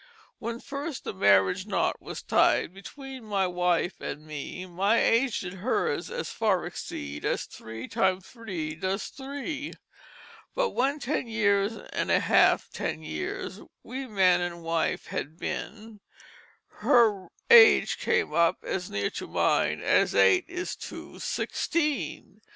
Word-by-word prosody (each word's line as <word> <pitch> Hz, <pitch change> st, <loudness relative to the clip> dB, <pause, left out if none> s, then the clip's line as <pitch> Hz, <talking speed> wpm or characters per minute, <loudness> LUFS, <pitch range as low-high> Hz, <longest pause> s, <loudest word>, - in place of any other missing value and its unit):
"When 230 Hz, 0 st, -4 dB
first 280 Hz, +1 st, -5 dB
the -, -, -4 dB
Marriage 100 Hz, -, +3 dB
Knot 205 Hz, -, 0 dB
was -, -, -7 dB
tied 175 Hz, -, +3 dB
Between 265 Hz, +6 st, -10 dB
my 200 Hz, -3 st, 0 dB
Wife 180 Hz, 0 st, 0 dB
and 150 Hz, -, -6 dB
Me 155 Hz, +4 st, -6 dB
My 195 Hz, +5 st, +1 dB
age 240 Hz, +1 st, +2 dB
did 180 Hz, 0 st, -6 dB
hers 195 Hz, +7 st, -1 dB
as 485 Hz, +1 st, -4 dB
far 205 Hz, -5 st, +1 dB
exceed 70 Hz, 0 st, -6 dB
As -, -, -1 dB
three 110 Hz, 0 st, -9 dB
times 190 Hz, -1 st, 0 dB
three 185 Hz, -10 st, -5 dB
does 190 Hz, +5 st, -3 dB
three. 280 Hz, +2 st, -5 dB, 0.8 s
But -, -, +1 dB
when 275 Hz, +4 st, +1 dB
Ten 275 Hz, -2 st, -2 dB
years 205 Hz, -2 st, +2 dB, 0.2 s
and -, -, -1 dB
half -, -, +4 dB
ten 80 Hz, +1 st, -3 dB
Years 80 Hz, -1 st, -5 dB, 0.2 s
We 260 Hz, +2 st, -6 dB
man 185 Hz, -5 st, +4 dB
and 170 Hz, -1 st, -4 dB
wife 165 Hz, 0 st, -1 dB
had 155 Hz, +3 st, -5 dB
been 220 Hz, +3 st, -6 dB, 0.7 s
Her 210 Hz, -6 st, +3 dB, 0.2 s
age 470 Hz, -2 st, +8 dB
came 470 Hz, -1 st, +1 dB
up 170 Hz, -1 st, +3 dB
as 180 Hz, -1 st, -3 dB
near 100 Hz, 0 st, -1 dB
to -, -, -6 dB
mine -, -, +1 dB
As -, -, +3 dB
eight 95 Hz, 0 st, +5 dB
is 355 Hz, +1 st, -4 dB
to -, -, -9 dB
sixteen. 305 Hz, -4 st, -2 dB
200 Hz, 140 wpm, -27 LUFS, 170-260 Hz, 0.8 s, age